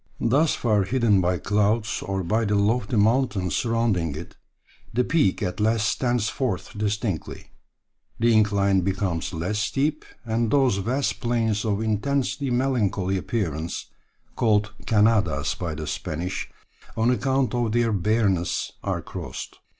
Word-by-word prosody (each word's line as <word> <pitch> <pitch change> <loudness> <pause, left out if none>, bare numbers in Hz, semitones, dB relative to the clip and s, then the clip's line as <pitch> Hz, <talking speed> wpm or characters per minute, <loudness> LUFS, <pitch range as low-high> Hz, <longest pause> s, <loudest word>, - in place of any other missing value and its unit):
Thus 140 +7 +2
far 105 -4 +2
hidden 115 -3 +3
by 90 0 +1
clouds 105 +3 0
or 95 -1 -2
by 110 +6 +1
the 105 0 +1
lofty 110 +3 +1
mountains 110 - +2
surrounding 115 - 0
it, 80 +3 -8 0.6
the 125 +2 +1
peak 125 - +1
at 90 +1 -3
last 110 0 +2
stands 120 -1 0
forth 110 -8 -3
distinctly, 105 -3 -3 0.7
the 115 0 +4
incline 100 -2 +3
becomes 90 -3 -1
less 90 +5 -2
steep, 145 +7 0 0.2
and 115 0 0
those 130 -6 +3
vast 125 +8 -1
plains 115 -3 0
of 105 0 0
intensely 135 +5 -1
melancholy 120 -7 0
appearance, 85 - -3 0.4
called 110 -1 +2
Cañadas 105 -9 +2
by 85 -3 -3
the 80 0 -5
Spanish, 80 +4 -4 0.5
on 115 +2 +3
account 130 0 +1
of 120 -2 0
their 115 -1 +2
bareness, 100 -2 +1
are - - -2
crossed. - - -7
110 Hz, 135 wpm, -24 LUFS, 95-120 Hz, 0.7 s, the